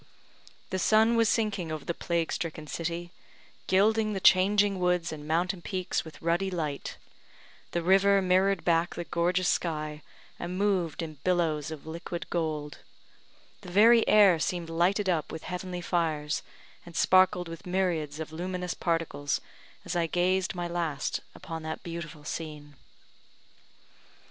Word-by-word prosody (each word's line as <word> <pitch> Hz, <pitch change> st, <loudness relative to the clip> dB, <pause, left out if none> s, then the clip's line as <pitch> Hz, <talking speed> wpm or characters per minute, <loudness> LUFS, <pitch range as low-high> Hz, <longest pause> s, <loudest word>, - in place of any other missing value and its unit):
The 190 Hz, -, -1 dB
sun 220 Hz, +4 st, +4 dB
was 230 Hz, -1 st, +4 dB
sinking 200 Hz, -7 st, 0 dB
over 155 Hz, -2 st, -5 dB
the 170 Hz, -, -1 dB
plague 170 Hz, -1 st, -1 dB
stricken 155 Hz, -2 st, -4 dB
city, 170 Hz, +2 st, -4 dB, 0.6 s
gilding 215 Hz, +3 st, +3 dB
the 195 Hz, -, -2 dB
changing 195 Hz, +1 st, +4 dB
woods 180 Hz, -1 st, +1 dB
and 150 Hz, -1 st, -8 dB
mountain 175 Hz, +3 st, 0 dB
peaks 185 Hz, 0 st, -2 dB
with 160 Hz, -, -12 dB
ruddy 170 Hz, +4 st, +1 dB
light; 155 Hz, -6 st, -4 dB, 0.7 s
the 170 Hz, -, -2 dB
river 195 Hz, +2 st, +5 dB
mirrored 190 Hz, +1 st, +2 dB
back 170 Hz, 0 st, +2 dB
the 175 Hz, -, -3 dB
gorgeous 175 Hz, +2 st, 0 dB
sky, 155 Hz, -2 st, -1 dB, 0.4 s
and 175 Hz, +1 st, -4 dB
moved 185 Hz, -6 st, 0 dB
in 155 Hz, -3 st, -8 dB
billows 160 Hz, -4 st, +1 dB
of 155 Hz, -2 st, -8 dB
liquid 170 Hz, +1 st, -6 dB
gold; 155 Hz, -3 st, -2 dB, 0.8 s
the 180 Hz, -, -10 dB
very 225 Hz, +5 st, +6 dB
air 200 Hz, -6 st, +6 dB
seemed 170 Hz, 0 st, -2 dB
lighted 185 Hz, +5 st, +2 dB
up 170 Hz, -4 st, 0 dB
with 160 Hz, -, -7 dB
heavenly 180 Hz, 0 st, -5 dB
fires, 160 Hz, -4 st, -1 dB, 0.4 s
and 170 Hz, -1 st, -13 dB
sparkled 185 Hz, -1 st, +4 dB
with 165 Hz, +3 st, -9 dB
myriads 170 Hz, -5 st, -1 dB
of 155 Hz, -1 st, -5 dB
luminous 180 Hz, +1 st, -3 dB
particles, 165 Hz, -4 st, -1 dB, 0.5 s
as -, -, -3 dB
I 170 Hz, -1 st, +1 dB
gazed 185 Hz, +3 st, +1 dB
my 175 Hz, -1 st, -2 dB
last 165 Hz, -4 st, -2 dB, 0.2 s
upon 165 Hz, -1 st, -7 dB
that 160 Hz, 0 st, -5 dB
beautiful 165 Hz, -3 st, -7 dB
scene. 150 Hz, -2 st, -6 dB
175 Hz, 145 wpm, -28 LUFS, 160-185 Hz, 0.8 s, very